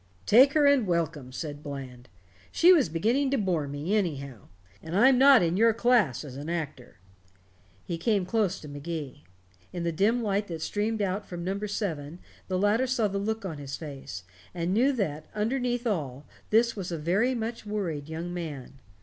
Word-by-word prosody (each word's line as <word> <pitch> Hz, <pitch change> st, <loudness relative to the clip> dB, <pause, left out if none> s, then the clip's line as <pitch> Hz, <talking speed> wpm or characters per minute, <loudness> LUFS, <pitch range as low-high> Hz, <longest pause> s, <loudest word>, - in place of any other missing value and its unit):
"Take 260 Hz, +6 st, +6 dB
her 300 Hz, -2 st, +4 dB
and 280 Hz, -6 st, +4 dB
welcome," 165 Hz, -6 st, -1 dB
said 145 Hz, +2 st, -6 dB
Bland. 130 Hz, -4 st, -8 dB, 0.4 s
"She 360 Hz, +2 st, +6 dB
was 295 Hz, -, +3 dB
beginning 230 Hz, -, +1 dB
to 275 Hz, -, +1 dB
bore 175 Hz, -8 st, 0 dB
me, 145 Hz, +8 st, -2 dB
anyhow. 140 Hz, -, -3 dB, 0.3 s
And 165 Hz, +3 st, -3 dB
I'm 250 Hz, +3 st, +6 dB
not 270 Hz, -5 st, +7 dB
in 170 Hz, +2 st, +1 dB
your 225 Hz, +1 st, +4 dB
class 230 Hz, -, +2 dB
as 135 Hz, -2 st, -9 dB
an 145 Hz, +3 st, -6 dB
actor." 150 Hz, -, -5 dB, 0.9 s
He 170 Hz, -1 st, -4 dB
came 205 Hz, -2 st, +1 dB
close 195 Hz, -1 st, 0 dB
to 150 Hz, -, -9 dB
Magee. 145 Hz, -1 st, -6 dB, 0.5 s
In 175 Hz, -, -4 dB
the 170 Hz, -, 0 dB
dim 220 Hz, +8 st, +1 dB
light 205 Hz, 0 st, 0 dB
that 165 Hz, -2 st, -5 dB
streamed 210 Hz, +1 st, -1 dB
out 200 Hz, +2 st, -2 dB
from 175 Hz, -1 st, -6 dB
number 200 Hz, +3 st, -2 dB
seven 165 Hz, -7 st, -4 dB, 0.3 s
the 185 Hz, -, -1 dB
latter 210 Hz, +6 st, +2 dB
saw 245 Hz, -4 st, +1 dB
the 200 Hz, 0 st, -3 dB
look 220 Hz, +1 st, -3 dB
on 160 Hz, -6 st, -5 dB
his 140 Hz, -1 st, -6 dB
face, 135 Hz, -, -8 dB, 0.3 s
and 175 Hz, +1 st, -1 dB
knew 250 Hz, +7 st, +4 dB
that, 155 Hz, -, -3 dB
underneath 245 Hz, +2 st, -1 dB
all, 145 Hz, -, -2 dB, 0.2 s
this 230 Hz, +2 st, +3 dB
was 185 Hz, -4 st, -5 dB
a 170 Hz, -, -2 dB
very 195 Hz, +11 st, +1 dB
much 230 Hz, -1 st, -4 dB
worried 170 Hz, -9 st, -3 dB
young 165 Hz, +2 st, -5 dB
man. 145 Hz, -6 st, -7 dB
185 Hz, 185 wpm, -27 LUFS, 155-225 Hz, 0.9 s, not